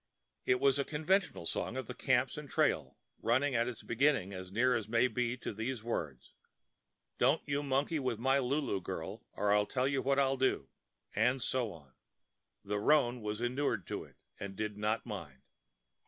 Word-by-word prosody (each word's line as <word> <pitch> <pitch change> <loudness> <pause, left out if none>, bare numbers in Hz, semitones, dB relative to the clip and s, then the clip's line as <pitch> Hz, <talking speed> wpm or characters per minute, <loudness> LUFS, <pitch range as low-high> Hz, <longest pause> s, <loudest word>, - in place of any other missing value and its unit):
It 125 - +4
was 140 0 +4
a - - +3
conventional 160 - 0
song - - -2
of - - -3
the - - -6
camps - - +1
and - - -7
trail, - - +1 0.2
running 130 +5 +2
at 120 0 +2
its 125 -3 -6
beginning 120 -5 +2
as 95 -1 -7
near 125 +5 +3
as 110 -3 -2
may 115 +2 +4
be 125 -1 -1
to 120 - -5
these 110 +2 -3
words: 75 - -4 0.9
Don't 135 +6 +3
you 140 0 0
monkey 145 +3 0
with 130 -4 -1
my 135 +4 +3
Lulu 135 -6 0
girl - - -5
Or 105 0 +2
I'll 105 0 +3
tell 130 0 +1
you 140 -1 +1
what 140 +1 +1
I'll 135 -1 +3
do— 130 - +1 0.5
and 125 +5 +3
so 125 -2 -1
on. 70 -7 -14 0.7
The 105 +1 -1
roan 125 -1 +3
was 105 +1 -3
inured 120 - 0
to - - -3
it, - - -18 0.2
and 100 -1 -6
did 105 0 -3
not 105 +2 -1
mind. 85 - -7
120 Hz, 185 wpm, -33 LUFS, 105-135 Hz, 0.9 s, It